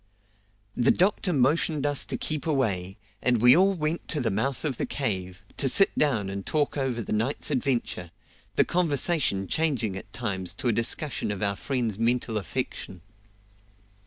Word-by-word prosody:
The 125 Hz, +1 st, +2 dB
doctor 185 Hz, 0 st, +2 dB
motioned 145 Hz, +1 st, +2 dB
us 145 Hz, -1 st, +2 dB
to -, -, -3 dB
keep 155 Hz, 0 st, -2 dB
away, 100 Hz, -, -1 dB, 0.2 s
and 125 Hz, -2 st, +2 dB
we 125 Hz, +3 st, +7 dB
all 195 Hz, +2 st, +4 dB
went 155 Hz, 0 st, -2 dB
to 150 Hz, -, -1 dB
the 120 Hz, -, 0 dB
mouth 125 Hz, +9 st, -1 dB
of 135 Hz, -5 st, -1 dB
the -, -, -2 dB
cave, 95 Hz, -7 st, -3 dB
to 135 Hz, -, +2 dB
sit 195 Hz, +9 st, +4 dB
down 120 Hz, -10 st, +2 dB
and 100 Hz, 0 st, -5 dB
talk 150 Hz, +4 st, 0 dB
over 130 Hz, -4 st, -1 dB
the -, -, -4 dB
night's 115 Hz, +8 st, -1 dB
adventure, 125 Hz, -9 st, -1 dB, 0.5 s
the -, -, +4 dB
conversation 155 Hz, -, +1 dB
changing 125 Hz, -, 0 dB
at 95 Hz, -, -8 dB
times 95 Hz, -6 st, -3 dB
to 125 Hz, -, -3 dB
a -, -, +2 dB
discussion 120 Hz, +5 st, -1 dB
of 105 Hz, -1 st, -3 dB
our 100 Hz, -1 st, 0 dB
friend's 115 Hz, -2 st, -2 dB
mental 115 Hz, -1 st, +1 dB
affection. 95 Hz, -3 st, -5 dB
125 Hz, 165 wpm, -26 LUFS, 100-150 Hz, 0.5 s, we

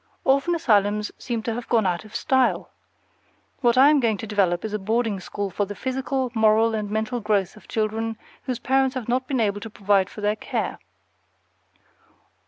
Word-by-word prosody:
Orphan 275 Hz, +6 st, +2 dB
asylums 210 Hz, -7 st, +2 dB, 0.3 s
have 230 Hz, +1 st, -4 dB
gone 225 Hz, -4 st, +3 dB
out 180 Hz, +2 st, -1 dB
of 215 Hz, -, -13 dB
style. 260 Hz, -1 st, +1 dB, 0.9 s
What 240 Hz, -2 st, +2 dB
I 275 Hz, +3 st, +8 dB
am 300 Hz, -, +4 dB
going 225 Hz, -5 st, +1 dB
to 225 Hz, -, -6 dB
develop 195 Hz, -4 st, +1 dB
is 215 Hz, -, -4 dB
a 210 Hz, -, -1 dB
boarding 220 Hz, 0 st, 0 dB
school 200 Hz, +2 st, -4 dB
for 205 Hz, +3 st, -1 dB
the 205 Hz, +1 st, -7 dB
physical, 260 Hz, 0 st, -2 dB
moral, 220 Hz, 0 st, +4 dB
and 210 Hz, -2 st, -2 dB
mental 220 Hz, +3 st, -1 dB
growth 200 Hz, -4 st, 0 dB
of 215 Hz, -, -17 dB
children 225 Hz, +1 st, -2 dB, 0.3 s
whose 255 Hz, -3 st, -2 dB
parents 265 Hz, +1 st, +1 dB
have 255 Hz, -4 st, -4 dB
not 255 Hz, +1 st, 0 dB
been 265 Hz, -3 st, -1 dB
able 205 Hz, -2 st, 0 dB
to 225 Hz, -, -7 dB
provide 200 Hz, -2 st, +1 dB
for 210 Hz, -, -10 dB
their 210 Hz, +1 st, +1 dB
care. -, -, -3 dB
220 Hz, 180 wpm, -24 LUFS, 205-255 Hz, 0.9 s, I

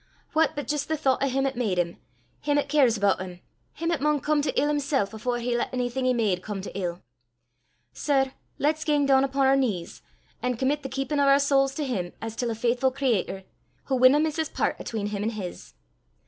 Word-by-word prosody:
What 320 Hz, 0 st, +2 dB
but 290 Hz, -4 st, -4 dB
jist 290 Hz, -1 st, -1 dB
the 315 Hz, -, -1 dB
thoucht 265 Hz, -3 st, +1 dB
o' 275 Hz, -, +2 dB
him 270 Hz, +1 st, 0 dB
'at 270 Hz, 0 st, -1 dB
made 220 Hz, -7 st, -1 dB
him, 170 Hz, -1 st, -1 dB, 0.4 s
him 290 Hz, 0 st, +1 dB
'at 285 Hz, -1 st, 0 dB
cares 270 Hz, -6 st, +4 dB
aboot 200 Hz, -2 st, +2 dB
him, 180 Hz, -1 st, -7 dB, 0.3 s
him 330 Hz, +1 st, -2 dB
'at 320 Hz, -5 st, -1 dB
maun 300 Hz, 0 st, +2 dB
come 300 Hz, +1 st, +1 dB
to 285 Hz, -2 st, 0 dB
ill 290 Hz, -, +2 dB
himsel' 285 Hz, -3 st, +1 dB
afore 240 Hz, +3 st, -2 dB
he 240 Hz, 0 st, -1 dB
lat 240 Hz, -, 0 dB
onything 250 Hz, +1 st, -1 dB
he 255 Hz, -, +3 dB
made 205 Hz, -6 st, +1 dB
come 205 Hz, 0 st, -5 dB
to 195 Hz, -, -8 dB
ill. 175 Hz, -2 st, -3 dB, 0.9 s
Sir, 270 Hz, -2 st, +1 dB, 0.3 s
lat 305 Hz, +2 st, +1 dB
's -, -, -4 dB
gang 295 Hz, -2 st, +2 dB
doon 270 Hz, -1 st, +5 dB
upo' 275 Hz, 0 st, -1 dB
oor 270 Hz, 0 st, +5 dB
knees, 215 Hz, -11 st, -1 dB, 0.4 s
an' 250 Hz, -1 st, -1 dB
commit 275 Hz, +4 st, 0 dB
the 270 Hz, -, -6 dB
keepin' 270 Hz, +2 st, -2 dB
o' 280 Hz, -, +4 dB
oor 275 Hz, 0 st, +7 dB
sowls 275 Hz, -1 st, +2 dB
to 300 Hz, -, -2 dB
him 185 Hz, -9 st, -3 dB
as 225 Hz, 0 st, -6 dB
til 240 Hz, 0 st, -1 dB
a 225 Hz, -, -2 dB
faithfu' 245 Hz, +3 st, +1 dB
creator, 235 Hz, -8 st, -1 dB, 0.5 s
wha 265 Hz, -, +2 dB
winna 255 Hz, +3 st, +6 dB
miss 310 Hz, 0 st, 0 dB
his 320 Hz, -1 st, -1 dB
pairt -, -, 0 dB
'atween 220 Hz, -3 st, -4 dB
him 205 Hz, -1 st, -3 dB
an' 215 Hz, -, 0 dB
hiz." 200 Hz, -6 st, -7 dB
265 Hz, 230 wpm, -26 LUFS, 225-285 Hz, 0.9 s, oor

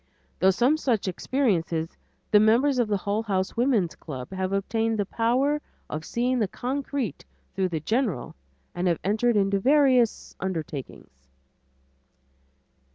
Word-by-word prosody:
Through 190 Hz, 0 st, +5 dB
some 255 Hz, +10 st, +3 dB
such 240 Hz, -10 st, 0 dB
experiences 175 Hz, -, -1 dB, 0.4 s
the 210 Hz, -, +7 dB
members 245 Hz, +6 st, +4 dB
of 240 Hz, -, +2 dB
the 205 Hz, -1 st, +1 dB
Hull 205 Hz, +3 st, -1 dB
House 190 Hz, -4 st, -2 dB
Woman's 230 Hz, -8 st, +2 dB
Club 130 Hz, -3 st, -8 dB
have 190 Hz, 0 st, -2 dB
obtained 225 Hz, +3 st, 0 dB
the 205 Hz, -, 0 dB
power 255 Hz, +8 st, +1 dB, 0.3 s
of 155 Hz, +1 st, -4 dB
seeing 250 Hz, +2 st, 0 dB
the 215 Hz, -, +1 dB
concrete 260 Hz, -, -3 dB, 0.3 s
through 190 Hz, -1 st, 0 dB
the 160 Hz, -3 st, -3 dB
general 220 Hz, -, -1 dB, 0.4 s
and 175 Hz, +1 st, -1 dB
have 170 Hz, -2 st, +2 dB
entered 215 Hz, +3 st, +2 dB
into 195 Hz, 0 st, +2 dB
various 260 Hz, -1 st, +3 dB
undertakings. 140 Hz, -, -6 dB
210 Hz, 135 wpm, -26 LUFS, 185-245 Hz, 0.4 s, the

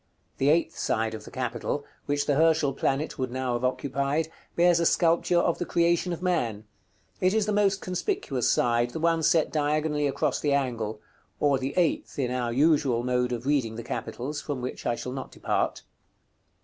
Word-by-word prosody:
The 135 Hz, -, +3 dB
eighth 165 Hz, +1 st, +2 dB
side 110 Hz, 0 st, -1 dB
of 110 Hz, -1 st, -7 dB
the -, -, -9 dB
capital, 130 Hz, +3 st, -3 dB, 0.2 s
which 145 Hz, 0 st, 0 dB
the 145 Hz, -, +2 dB
Herschel 160 Hz, -1 st, +3 dB
planet 135 Hz, +3 st, -1 dB
would 130 Hz, -1 st, -1 dB
now 130 Hz, 0 st, -2 dB
have 120 Hz, +1 st, -2 dB
occupied, 140 Hz, +4 st, -1 dB, 0.2 s
bears 175 Hz, 0 st, +4 dB
a 170 Hz, -, +1 dB
sculpture 170 Hz, +1 st, +3 dB
of 170 Hz, -1 st, +2 dB
the -, -, 0 dB
Creation 170 Hz, +1 st, +2 dB
of 170 Hz, +1 st, -5 dB
Man: 120 Hz, -, 0 dB, 0.6 s
it 185 Hz, +3 st, +2 dB
is 220 Hz, -2 st, +2 dB
the 210 Hz, -, 0 dB
most 200 Hz, -1 st, +2 dB
conspicuous 180 Hz, -, -1 dB
side, 120 Hz, 0 st, +2 dB
the -, -, -3 dB
one 165 Hz, 0 st, +2 dB
set 160 Hz, 0 st, +3 dB
diagonally 150 Hz, 0 st, +1 dB
across 135 Hz, -, 0 dB
the 145 Hz, -2 st, +1 dB
angle; 115 Hz, -6 st, -1 dB, 0.4 s
or 140 Hz, -2 st, +3 dB
the 135 Hz, +1 st, -3 dB
eighth 175 Hz, -3 st, 0 dB
in 130 Hz, -3 st, 0 dB
our 125 Hz, -2 st, -1 dB
usual 140 Hz, -3 st, +3 dB
mode 125 Hz, 0 st, 0 dB
of 120 Hz, 0 st, -4 dB
reading 135 Hz, -6 st, +1 dB
the 115 Hz, -, -6 dB
capitals, 145 Hz, +7 st, -4 dB
from 145 Hz, -3 st, -4 dB
which 125 Hz, +1 st, -5 dB
I 120 Hz, -, +1 dB
shall 125 Hz, -, -5 dB
not 135 Hz, 0 st, -6 dB
depart. -, -, -1 dB
145 Hz, 190 wpm, -27 LUFS, 125-165 Hz, 0.6 s, bears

